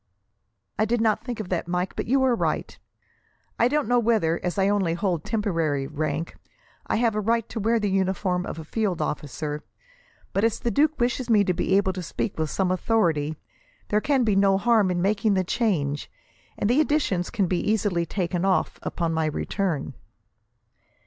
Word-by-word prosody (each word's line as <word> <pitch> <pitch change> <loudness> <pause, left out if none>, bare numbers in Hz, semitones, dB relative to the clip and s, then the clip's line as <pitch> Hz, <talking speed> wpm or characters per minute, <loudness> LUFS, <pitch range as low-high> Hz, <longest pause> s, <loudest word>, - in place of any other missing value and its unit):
"I 215 - +4
did 235 +2 0
not 220 -2 +1
think 245 -3 -5
of 205 -4 -5
that, 175 -2 -2
Mike; 180 +1 -2
but - - -3
you 265 +2 +3
are 260 -2 +3
right. 235 - -1 0.8
I 235 - +5
don't 295 -2 0
know 245 +1 +3
whether, 215 -8 +2
as 180 +2 -2
I 195 0 +3
only 195 -5 +1
hold 175 -3 -1
temporary 165 -11 -1
rank, 155 +2 -3 0.5
I - - 0
have 230 0 +2
a 215 - -1
right 230 +1 +1
to 230 - -4
wear 225 +2 +2
the 205 -2 -1
uniform 190 -1 0
of - - -5
a 160 - -6
field 195 +2 -1
officer; 150 +1 -3 0.7
but, 195 - +1
as 225 -1 +1
the 235 - -1
duke 305 +3 +2
wishes 245 +1 0
me 210 -3 +5
to 185 - +1
be 190 +2 +2
able 190 -1 +1
to 185 - -5
speak 180 +2 -4
with 155 -1 0
some 185 +2 0
authority, 165 -7 +1 0.5
there 210 0 +2
can 275 -1 +2
be 215 -4 +2
no 195 0 +4
harm 220 -2 +3
in 175 -1 0
making 210 +1 +2
the 185 - +2
change, 170 - -1 0.5
and - - 0
the 250 +7 +4
additions 275 - 0
can 200 -5 0
easily 200 -1 +1
be - - -1
taken 175 0 -2
off, 195 -1 +1
upon 170 -2 -2
my 160 -1 +1
return." 155 -1 -2
195 Hz, 190 wpm, -25 LUFS, 170-225 Hz, 0.8 s, I